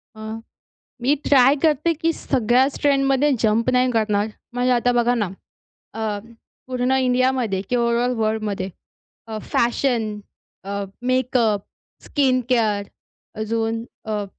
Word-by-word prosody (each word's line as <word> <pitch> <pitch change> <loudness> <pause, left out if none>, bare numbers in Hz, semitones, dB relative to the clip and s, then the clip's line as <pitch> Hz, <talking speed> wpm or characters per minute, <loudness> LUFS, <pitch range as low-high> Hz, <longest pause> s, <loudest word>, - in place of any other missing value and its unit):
अ, - - -13 0.8
मी 270 +4 +3
try 270 0 +6
करते 315 +1 +3
की 330 +1 0
सगळ्याच 255 0 +1
ट्रेंडमध्ये 275 0 +3
जंप 225 +2 +2
नाही 250 0 +3
करणार. 215 -2 +1 0.3
म्हणजे 250 +1 +1
आता 245 0 +3
बघा 240 +1 +2
ना, 210 -5 -1 0.6
अ, 215 -2 -2 0.5
पूर्ण 255 0 -1
इंडियामध्ये 250 -5 +1
किंवा 245 -1 +2
ओवरऑल 235 +1 +1
वर्ल्डमध्ये, 215 -3 -1 0.6
अ, 220 -1 -5
फॅशन, 235 -3 +1 0.4
अ, 200 +1 -3 0.3
मेकअप, 240 -5 +2 0.4
स्किन 260 -3 +1
केअर, 215 -5 +2 0.6
अजून 225 +1 -1 0.2
अ, 210 -1 -1
240 Hz, 115 wpm, -22 LUFS, 220-255 Hz, 0.8 s, try